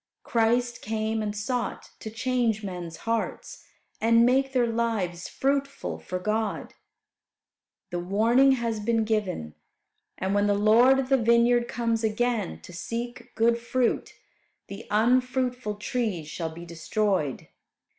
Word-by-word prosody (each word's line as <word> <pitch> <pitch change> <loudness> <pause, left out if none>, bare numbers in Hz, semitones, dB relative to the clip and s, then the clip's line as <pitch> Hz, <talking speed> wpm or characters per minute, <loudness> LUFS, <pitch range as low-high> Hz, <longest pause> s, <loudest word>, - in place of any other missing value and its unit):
Christ 240 +1 +1
came 220 0 -2
and 210 -1 -3
sought 245 +3 -3
to 220 - -6
change 230 -1 0
men's 175 -4 -6
hearts, 230 0 -3 0.4
and 230 +1 +5
make 265 +2 +2
their 250 -2 +2
lives 225 -7 -1
fruitful 275 0 -2
for 185 - -4
God. 215 +3 -2 1.2
The 175 - -2
warning 230 +9 +4
has 230 -3 -1
been 225 +1 +1
given, 200 - -2 0.6
and 190 +1 -1
when 205 0 +2
the 205 - +3
Lord 225 +6 +5
of 265 -1 -1
the 270 - +5
vineyard 235 +1 +4
comes 230 -1 -1
again 220 -1 -1
to 180 - -12
seek 235 +6 -6
good 235 +1 +3
fruit 240 +1 -1 0.5
the 200 +3 -8
unfruitful 250 0 +1
trees 210 -6 -2
shall 165 +1 -4
be 170 +2 -10
destroyed. 170 - -1
225 Hz, 130 wpm, -26 LUFS, 205-245 Hz, 1.2 s, and